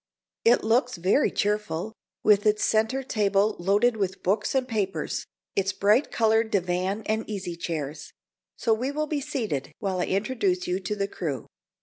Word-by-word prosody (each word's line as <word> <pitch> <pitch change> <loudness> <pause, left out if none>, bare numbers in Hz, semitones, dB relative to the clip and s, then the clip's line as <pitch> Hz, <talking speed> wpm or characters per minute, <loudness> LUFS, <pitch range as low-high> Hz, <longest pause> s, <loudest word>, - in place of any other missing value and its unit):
It 235 +2 +5
looks 245 +3 +2
very 185 - +3
cheerful, 210 -2 -1 0.3
with 210 0 +4
its 210 0 +3
centre 225 +5 +1
table 210 -3 +1
loaded 205 +6 +3
with 190 -2 -2
books 205 +7 0
and 260 -1 +1
papers, 205 -5 -2 0.3
its 195 0 +1
bright 210 +8 +3
colored 225 0 +2
divan 185 +2 0
and 220 +1 0
easy 190 -4 -4
chairs; 160 -3 -5 0.4
so 230 - +1
we 245 +5 -1
will 305 +2 -1
be 300 -1 -2
seated 215 - -3
while 190 -2 -2
I 180 - +1
introduce 195 -3 0
you 180 +1 -1
to 195 +2 -3
the 200 -1 -1
crew. 155 -9 -4
210 Hz, 160 wpm, -26 LUFS, 185-225 Hz, 0.4 s, It